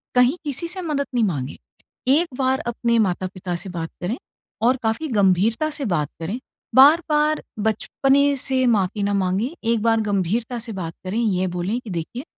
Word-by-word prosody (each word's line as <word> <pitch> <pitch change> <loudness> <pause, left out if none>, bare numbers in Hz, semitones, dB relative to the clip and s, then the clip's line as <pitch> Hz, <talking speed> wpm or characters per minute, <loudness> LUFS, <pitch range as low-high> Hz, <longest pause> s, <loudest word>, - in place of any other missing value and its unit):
कहीं 250 +6 +4
किसी 290 +2 -1
से 365 +2 -4
मदद 300 -5 -1
नहीं 240 - +3
माँगे। 145 -10 -2 0.5
एक 305 +7 +4
बार 265 0 +1
अपने 235 0 +1
माता-पिता 185 -2 -1
से 195 - -7
बात 165 -2 -4
करें 195 +8 -2 0.5
और 255 +1 +3
काफ़ी 225 +8 0
गंभीरता 205 - +3
से 290 -2 -4
बात 160 - 0
करें, 195 +10 -3 0.4
बार-बार 300 +2 +5 0.2
बचपने 270 +6 +2
से 260 -1 +1
माफ़ी 205 -2 +1
ना 205 0 +1
माँगे। 195 +6 0 0.2
एक 230 -2 +1
बार 225 -1 +3
गंभीरता 210 +4 -1
से 225 0 -4
बात 165 -2 -4
करें, 195 +5 -1
ये 190 -5 +1
बोलें 190 +7 -1
कि 245 - -11
देखिए 180 +8 -4
225 Hz, 170 wpm, -22 LUFS, 185-265 Hz, 0.5 s, बार-बार